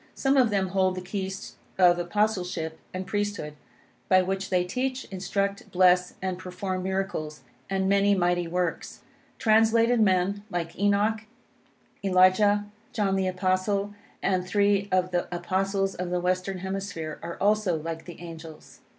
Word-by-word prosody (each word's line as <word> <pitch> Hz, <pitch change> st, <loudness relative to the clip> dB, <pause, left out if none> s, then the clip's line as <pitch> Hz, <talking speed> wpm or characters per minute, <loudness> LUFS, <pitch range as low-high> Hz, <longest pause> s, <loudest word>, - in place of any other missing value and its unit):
Some 270 Hz, 0 st, +2 dB
of 255 Hz, -4 st, +5 dB
them 195 Hz, -2 st, 0 dB
hold 185 Hz, 0 st, +1 dB
the 185 Hz, -, -4 dB
keys 190 Hz, +1 st, -5 dB, 0.2 s
of 175 Hz, -2 st, +5 dB
Apostleship 180 Hz, -4 st, -1 dB
and 185 Hz, +1 st, -5 dB
Priesthood, 205 Hz, -7 st, -3 dB, 0.6 s
by 185 Hz, -1 st, +5 dB
which 190 Hz, +1 st, -3 dB
they 180 Hz, -1 st, +2 dB
teach, 255 Hz, +8 st, -2 dB
instruct, 195 Hz, +1 st, -2 dB
bless, 180 Hz, 0 st, +4 dB
and 185 Hz, -1 st, -2 dB
perform 185 Hz, +1 st, -4 dB
miracles 185 Hz, -6 st, -3 dB, 0.3 s
and 190 Hz, 0 st, 0 dB
many 200 Hz, +1 st, +4 dB
mighty 175 Hz, -1 st, +1 dB
works. 175 Hz, 0 st, -3 dB, 0.4 s
Translated 225 Hz, +1 st, +4 dB
men, 190 Hz, 0 st, +2 dB
like 170 Hz, -2 st, -3 dB
Enoch, 205 Hz, +2 st, +2 dB, 0.8 s
Elijah, 195 Hz, +2 st, +4 dB, 0.3 s
John 200 Hz, -4 st, +1 dB
the 190 Hz, -1 st, +1 dB
Apostle, 185 Hz, +2 st, 0 dB, 0.3 s
and 185 Hz, -2 st, +1 dB
three 200 Hz, +1 st, +1 dB
of 185 Hz, 0 st, +1 dB
the 175 Hz, -1 st, 0 dB
Apostles 195 Hz, +2 st, -1 dB
of 180 Hz, 0 st, -4 dB
the 180 Hz, 0 st, 0 dB
Western 185 Hz, +2 st, -1 dB
Hemisphere, 190 Hz, -4 st, -5 dB
are 170 Hz, 0 st, -6 dB
also 205 Hz, -4 st, +2 dB
like 160 Hz, +1 st, -6 dB
the 175 Hz, -, -10 dB
angels. 165 Hz, -2 st, -11 dB
190 Hz, 140 wpm, -26 LUFS, 180-200 Hz, 0.8 s, of